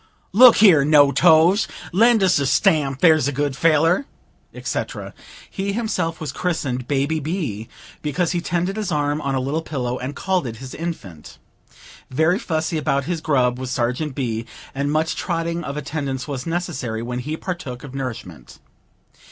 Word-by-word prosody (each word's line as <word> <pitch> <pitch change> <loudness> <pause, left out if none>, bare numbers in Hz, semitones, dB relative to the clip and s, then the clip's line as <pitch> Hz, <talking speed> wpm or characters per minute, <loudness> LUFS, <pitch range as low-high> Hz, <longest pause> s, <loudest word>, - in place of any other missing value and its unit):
"Look 245 +3 +8
here, 180 -9 +6
No 145 -1 +5
Toes, 170 +5 +4 0.3
lend 225 +2 +4
us 180 -5 +3
a 140 - 0
stamp, 135 -2 +2
there's 155 -5 +5
a - - 0
good 145 0 -1
feller," 165 - +2 0.4
etc. - - -5 0.3
He 200 0 -3
himself 185 -7 -2
was 155 -4 -4
christened 135 -8 -2
"Baby 145 +3 0
B.," 145 - -4 0.3
because 155 +3 -1
he 175 -2 -1
tended 175 +4 -2
his 210 -4 -2
arm 145 0 0
on 140 -2 -1
a - - +1
little 140 +5 -2
pillow, 130 -6 -3
and 135 +3 -5
called 185 -5 -1
it 115 - -6
his 130 +3 -9
infant. 125 - -7 0.7
Very 160 +8 +2
fussy 160 -2 -2
about 140 -1 0
his 170 +1 -3
grub 125 -5 +1
was 130 -1 -5
Sergeant 125 +4 -2
B., 115 -4 -3 0.3
and 140 +1 -1
much 155 +1 0
trotting 170 -1 -2
of 140 - -5
attendants 140 -3 -4
was 135 -1 -5
necessary 130 -10 -3
when 125 +1 -4
he 150 +5 -4
partook 150 -10 -6
of 140 -3 -9
nourishment. 115 - -7
150 Hz, 165 wpm, -21 LUFS, 130-170 Hz, 0.7 s, Look